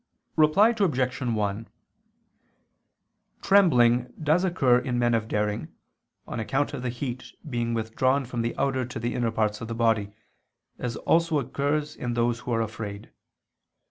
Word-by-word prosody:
Reply 185 Hz, +9 st, +5 dB
Obj. 130 Hz, -, 0 dB
1: 110 Hz, -3 st, -1 dB, 1.8 s
Trembling 125 Hz, -11 st, +4 dB
does 155 Hz, +3 st, +2 dB
occur 135 Hz, -10 st, +3 dB
in 125 Hz, -1 st, -2 dB
men 120 Hz, -1 st, +2 dB
of 110 Hz, -1 st, 0 dB
daring, 105 Hz, -4 st, -1 dB, 0.6 s
on 120 Hz, -, -4 dB
account 135 Hz, +6 st, -1 dB
of -, -, -4 dB
the 125 Hz, -, -2 dB
heat 125 Hz, +1 st, -5 dB
being 120 Hz, -3 st, -1 dB
withdrawn 130 Hz, +5 st, 0 dB
from 120 Hz, -1 st, -3 dB
the 115 Hz, +1 st, -3 dB
outer 135 Hz, -1 st, 0 dB
to 125 Hz, -, -6 dB
the 120 Hz, +1 st, -2 dB
inner 120 Hz, -2 st, 0 dB
parts 110 Hz, -1 st, -1 dB
of 115 Hz, -, -5 dB
the 115 Hz, -, -4 dB
body, 110 Hz, -3 st, +1 dB, 0.7 s
as 120 Hz, -2 st, -3 dB
occurs 165 Hz, +7 st, +2 dB, 0.7 s
also -, -, -18 dB
in 120 Hz, -1 st, -2 dB
those 120 Hz, 0 st, +1 dB
who 125 Hz, -, -6 dB
are 115 Hz, -1 st, +1 dB
afraid. 105 Hz, -2 st, -6 dB
120 Hz, 150 wpm, -26 LUFS, 115-130 Hz, 1.8 s, Reply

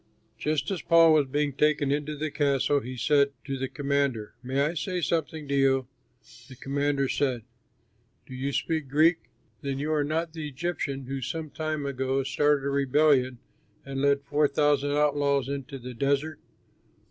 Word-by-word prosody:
Just 155 Hz, +2 st, -1 dB
as 185 Hz, -, -2 dB
Paul 165 Hz, -1 st, +6 dB
was 150 Hz, -3 st, +3 dB
being 145 Hz, +1 st, -1 dB
taken 150 Hz, 0 st, +2 dB
into 150 Hz, +1 st, -2 dB
the 155 Hz, +1 st, -3 dB
castle, 145 Hz, -1 st, +2 dB
he 130 Hz, 0 st, -7 dB
said 140 Hz, +1 st, +3 dB
to 135 Hz, -1 st, -3 dB
the 135 Hz, 0 st, -3 dB
commander, 140 Hz, -6 st, -1 dB
"May 130 Hz, +2 st, -2 dB
I 150 Hz, +4 st, +1 dB
say 175 Hz, +3 st, -2 dB
something 160 Hz, -3 st, -2 dB
to 140 Hz, -, -2 dB
you?" 135 Hz, -2 st, +2 dB, 0.6 s
The 130 Hz, -, -10 dB
commander 140 Hz, +1 st, -1 dB
said: 130 Hz, -4 st, -1 dB, 0.8 s
"Do 130 Hz, -, -11 dB
you 135 Hz, +2 st, -3 dB
speak 155 Hz, +1 st, -1 dB
Greek? 160 Hz, +4 st, +4 dB, 0.4 s
Then 140 Hz, -1 st, -3 dB
you 150 Hz, +3 st, -1 dB
are 150 Hz, -1 st, +2 dB
not 160 Hz, +2 st, -2 dB
the 160 Hz, -2 st, -5 dB
Egyptian 140 Hz, -2 st, -3 dB
who 135 Hz, +1 st, -4 dB
some 155 Hz, +4 st, -4 dB
time 155 Hz, -1 st, -3 dB
ago 135 Hz, 0 st, -1 dB
started 140 Hz, +1 st, +1 dB
a -, -, 0 dB
rebellion 140 Hz, -2 st, +3 dB, 0.5 s
and 135 Hz, -1 st, -4 dB
led 140 Hz, 0 st, +2 dB
four 145 Hz, +1 st, +2 dB
thousand 145 Hz, 0 st, +1 dB
outlaws 145 Hz, -2 st, +2 dB
into 140 Hz, 0 st, -5 dB
the 125 Hz, 0 st, -8 dB
desert?" 140 Hz, +5 st, -1 dB
140 Hz, 170 wpm, -27 LUFS, 135-150 Hz, 0.8 s, Paul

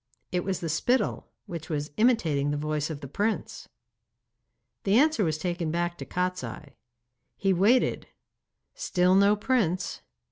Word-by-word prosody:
It 180 Hz, -1 st, 0 dB
was 190 Hz, -2 st, -2 dB
the 170 Hz, -, -2 dB
spittle, 240 Hz, +11 st, 0 dB, 0.2 s
which 165 Hz, -2 st, -7 dB
was 150 Hz, -2 st, -3 dB
imitating 165 Hz, -, +2 dB
the 145 Hz, -, -1 dB
voice 150 Hz, 0 st, -2 dB
of 155 Hz, -2 st, -6 dB
the 140 Hz, -, -7 dB
prince. 205 Hz, +10 st, -2 dB, 1.1 s
The 200 Hz, +2 st, +3 dB
answer 300 Hz, -4 st, +4 dB
was 155 Hz, -3 st, 0 dB
taken 175 Hz, 0 st, -2 dB
back 175 Hz, +1 st, -1 dB
to -, -, -5 dB
Kostiei. 180 Hz, -5 st, -3 dB, 0.7 s
He 195 Hz, -1 st, +2 dB
waited; 210 Hz, +8 st, +2 dB, 0.7 s
still 185 Hz, -, +2 dB
no 200 Hz, +2 st, +5 dB
prince. 210 Hz, -6 st, 0 dB
180 Hz, 140 wpm, -27 LUFS, 155-205 Hz, 1.1 s, no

